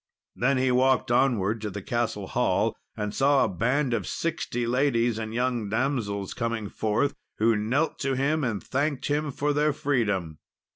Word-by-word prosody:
Then 130 Hz, +2 st, +2 dB
he 130 Hz, 0 st, +2 dB
walked 130 Hz, 0 st, +3 dB
onward 115 Hz, -4 st, +2 dB
to 105 Hz, -, -3 dB
the 100 Hz, 0 st, -7 dB
castle 115 Hz, -4 st, -1 dB
hall, -, -, +1 dB, 0.2 s
and 105 Hz, 0 st, -3 dB
saw 140 Hz, 0 st, +4 dB
a -, -, +2 dB
band 125 Hz, +7 st, 0 dB
of -, -, -1 dB
sixty 120 Hz, -7 st, -2 dB
ladies 120 Hz, -2 st, +1 dB
and 110 Hz, -1 st, -4 dB
young 120 Hz, -2 st, -1 dB
damsels 110 Hz, -5 st, -1 dB
coming 115 Hz, -3 st, -2 dB
forth, 110 Hz, +6 st, 0 dB, 0.2 s
who 115 Hz, +1 st, +3 dB
knelt 125 Hz, +10 st, 0 dB
to 135 Hz, -2 st, 0 dB
him, 145 Hz, +4 st, +1 dB
and 115 Hz, -6 st, -2 dB
thanked 140 Hz, +1 st, -1 dB
him 150 Hz, 0 st, 0 dB
for 145 Hz, +2 st, 0 dB
their 150 Hz, +1 st, +2 dB
freedom. 100 Hz, -, -1 dB
120 Hz, 165 wpm, -26 LUFS, 110-140 Hz, 0.2 s, saw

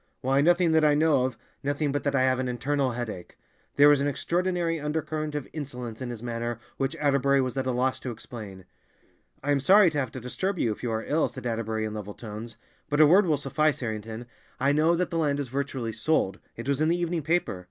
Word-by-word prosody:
"Why, 135 Hz, +1 st, +2 dB
nothing 175 Hz, +2 st, +4 dB
that 160 Hz, -1 st, +4 dB
I 150 Hz, -1 st, +5 dB
know 150 Hz, -4 st, +3 dB
of—nothing 140 Hz, +4 st, -3 dB
but 145 Hz, -, -1 dB
that 140 Hz, -1 st, +1 dB
I 130 Hz, -, +3 dB
have 130 Hz, -1 st, +2 dB
an 130 Hz, -, -1 dB
internal 130 Hz, +2 st, 0 dB
headache." 115 Hz, -7 st, -6 dB, 0.4 s
There 145 Hz, +1 st, +7 dB
was 145 Hz, -1 st, +5 dB
an 140 Hz, -, +1 dB
extraordinary 170 Hz, +2 st, 0 dB
undercurrent 155 Hz, 0 st, -3 dB
of 145 Hz, -3 st, -3 dB
insolence 125 Hz, -6 st, -6 dB
in 125 Hz, -, -4 dB
his 120 Hz, -1 st, -7 dB
manner 120 Hz, -1 st, -3 dB, 0.2 s
which 135 Hz, +3 st, -1 dB
Atterbury 140 Hz, -2 st, +2 dB
was 130 Hz, -1 st, -1 dB
at 130 Hz, -1 st, -1 dB
a -, -, +1 dB
loss 130 Hz, +1 st, 0 dB
to 130 Hz, -, -5 dB
explain. 105 Hz, -5 st, -9 dB, 0.8 s
"I 145 Hz, -, 0 dB
am 140 Hz, -, +3 dB
sorry 190 Hz, +5 st, +6 dB
to 150 Hz, -, -1 dB
have 130 Hz, -4 st, -1 dB
to 130 Hz, -, -5 dB
disturb 185 Hz, -, -3 dB
you 115 Hz, -, +1 dB
if 105 Hz, -, -6 dB
you 120 Hz, -, -2 dB
are 110 Hz, 0 st, -2 dB
ill," 155 Hz, +2 st, +1 dB
said 130 Hz, -, -10 dB
Atterbury 110 Hz, -2 st, -2 dB
in 105 Hz, -, -4 dB
level 105 Hz, -1 st, -6 dB
tones, 110 Hz, +1 st, -8 dB, 0.3 s
"but 145 Hz, -, 0 dB
a 155 Hz, -, +9 dB
word 185 Hz, +6 st, +5 dB
will 155 Hz, -3 st, +2 dB
suffice, 150 Hz, +1 st, 0 dB
Harrington. 110 Hz, 0 st, -5 dB, 0.3 s
I 140 Hz, +2 st, +3 dB
know 155 Hz, +3 st, +3 dB
that 180 Hz, +1 st, -1 dB
the 165 Hz, -, 0 dB
land 145 Hz, -3 st, +1 dB
is 140 Hz, -4 st, -3 dB
virtually 130 Hz, -3 st, -3 dB
sold—it 115 Hz, -2 st, -2 dB
was 140 Hz, +1 st, 0 dB
in 155 Hz, -, +3 dB
the 170 Hz, +2 st, +2 dB
evening 175 Hz, -1 st, -1 dB
paper. 160 Hz, -, 0 dB
140 Hz, 225 wpm, -27 LUFS, 120-155 Hz, 0.8 s, a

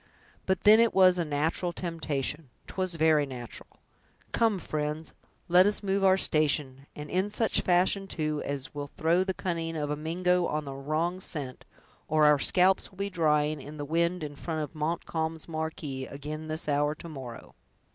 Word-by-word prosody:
But 190 Hz, -2 st, +1 dB
then 215 Hz, +2 st, +8 dB
it 230 Hz, -1 st, +3 dB
was 185 Hz, -1 st, +6 dB
a -, -, +2 dB
natural 160 Hz, +4 st, -1 dB
temptation! 155 Hz, -4 st, -3 dB, 0.2 s
'twas 185 Hz, -2 st, -2 dB
very 155 Hz, -2 st, +3 dB
natural! 120 Hz, -3 st, -8 dB, 0.6 s
Come, 225 Hz, -3 st, +2 dB
friends, 155 Hz, -1 st, -4 dB, 0.3 s
let 180 Hz, +2 st, +6 dB
us 205 Hz, 0 st, 0 dB
move 195 Hz, 0 st, 0 dB
our 190 Hz, 0 st, +5 dB
station, 145 Hz, -5 st, +1 dB
and 150 Hz, 0 st, -7 dB
in 185 Hz, +5 st, 0 dB
such 220 Hz, +1 st, +1 dB
fashion, 185 Hz, +2 st, +2 dB
too, 155 Hz, -4 st, -2 dB
as 140 Hz, +1 st, -4 dB
will 145 Hz, -1 st, -5 dB
throw 170 Hz, +3 st, +3 dB
the 190 Hz, -1 st, -3 dB
cunning 165 Hz, -3 st, -3 dB
of 150 Hz, -2 st, -2 dB
a -, -, 0 dB
Mingo 175 Hz, +3 st, +1 dB
on 150 Hz, -1 st, -3 dB
a 135 Hz, -, -5 dB
wrong 155 Hz, +6 st, -1 dB
scent, 140 Hz, -8 st, -5 dB, 0.4 s
or 155 Hz, 0 st, +3 dB
our 150 Hz, -1 st, +5 dB
scalps 185 Hz, +5 st, +3 dB
will 190 Hz, -, -21 dB
be 200 Hz, +1 st, -3 dB
drying 150 Hz, -3 st, +1 dB
in 150 Hz, +3 st, -9 dB
the 145 Hz, -, -4 dB
wind 170 Hz, +3 st, 0 dB
in 145 Hz, -1 st, -6 dB
front 160 Hz, +1 st, -4 dB
of 150 Hz, -, -7 dB
Montcalm's 160 Hz, 0 st, -3 dB
marquee, 155 Hz, -4 st, -4 dB
ag'in 150 Hz, +3 st, -7 dB
this 155 Hz, 0 st, -2 dB
hour 145 Hz, +1 st, +1 dB
to 170 Hz, -, -10 dB
morrow." 130 Hz, -7 st, -9 dB
160 Hz, 175 wpm, -28 LUFS, 150-180 Hz, 0.6 s, then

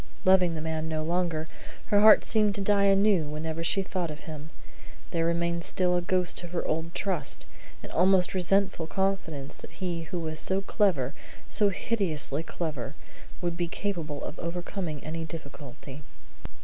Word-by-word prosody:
Loving 185 Hz, -3 st, +5 dB
the 155 Hz, -, -4 dB
man 160 Hz, 0 st, -2 dB
no 155 Hz, -1 st, -1 dB
longer, 165 Hz, -1 st, 0 dB, 0.5 s
her 205 Hz, -, +7 dB
heart 215 Hz, 0 st, +8 dB
seeming 210 Hz, -2 st, +3 dB
to 200 Hz, -, -2 dB
die 200 Hz, 0 st, +3 dB
anew 195 Hz, -3 st, +4 dB
whenever 160 Hz, +2 st, -4 dB
she 195 Hz, +3 st, +2 dB
even 190 Hz, -, -9 dB
thought 180 Hz, -3 st, -1 dB
of 150 Hz, 0 st, -7 dB
him, 155 Hz, -1 st, -8 dB, 0.6 s
there 165 Hz, -1 st, +1 dB
remained 170 Hz, 0 st, 0 dB
still 180 Hz, 0 st, +1 dB
a 175 Hz, -, +2 dB
ghost 180 Hz, 0 st, +1 dB
of 175 Hz, 0 st, -9 dB
her 175 Hz, -, -1 dB
old 165 Hz, +2 st, -2 dB
trust; 175 Hz, -8 st, -1 dB, 0.4 s
an -, -, -8 dB
almost 185 Hz, +1 st, +3 dB
resentful 185 Hz, -2 st, +1 dB
confidence 165 Hz, -8 st, -2 dB
that -, -, -12 dB
he 175 Hz, -3 st, -3 dB
who 175 Hz, +3 st, -4 dB
was 155 Hz, -1 st, -1 dB
so 190 Hz, +1 st, +3 dB
clever, 185 Hz, -, +1 dB, 0.4 s
so 205 Hz, -1 st, +3 dB
hideously 170 Hz, -9 st, -1 dB
clever, 155 Hz, -5 st, -5 dB, 0.5 s
would 175 Hz, -1 st, -1 dB
be 175 Hz, 0 st, -1 dB
capable 165 Hz, -6 st, -3 dB
of 150 Hz, -, -6 dB
overcoming 175 Hz, -2 st, -4 dB
any 165 Hz, +1 st, -4 dB
difficulty. 145 Hz, -3 st, -9 dB
170 Hz, 165 wpm, -28 LUFS, 155-190 Hz, 0.6 s, heart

